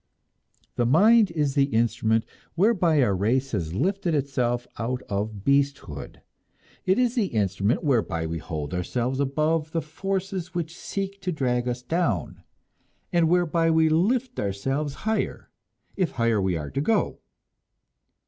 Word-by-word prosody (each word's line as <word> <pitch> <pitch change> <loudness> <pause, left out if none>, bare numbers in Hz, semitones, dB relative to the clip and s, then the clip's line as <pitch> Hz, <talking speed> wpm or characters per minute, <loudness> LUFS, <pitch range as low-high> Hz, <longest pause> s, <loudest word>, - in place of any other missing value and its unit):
The 120 - +2
mind 210 - +6
is 150 -4 0
the 140 -1 +4
instrument 115 -3 +1 0.3
whereby 175 - +3
our 100 -5 +2
race 125 +8 0
has 85 -5 -2
lifted 185 - 0
itself 125 -4 0
out 125 +2 -2
of 100 0 -3
beasthood. 140 - -1 0.7
It 190 - +4
is 250 -2 +2
the 230 -6 +1
instrument 100 - 0
whereby 110 - +1
we 80 +1 -3
hold 80 0 -5
ourselves 120 +9 -1
above 155 +3 0
the 165 - 0
forces 190 +2 -4
which 170 -1 -3
seek 195 +1 -5
to 185 -1 -2
drag 125 -5 0
us 125 0 -3
down, 125 - -1 0.7
and 170 -2 +3
whereby 170 -1 +2
we 160 0 +4
shall 155 - +3
lift 250 +5 0
ourselves 135 +9 -2
higher, 220 0 -2 0.4
if 185 -6 0
higher 115 -3 +1
we 95 -3 0
are 75 -2 -6
to 140 - -1
go. 220 +9 +1
140 Hz, 145 wpm, -25 LUFS, 110-175 Hz, 0.7 s, mind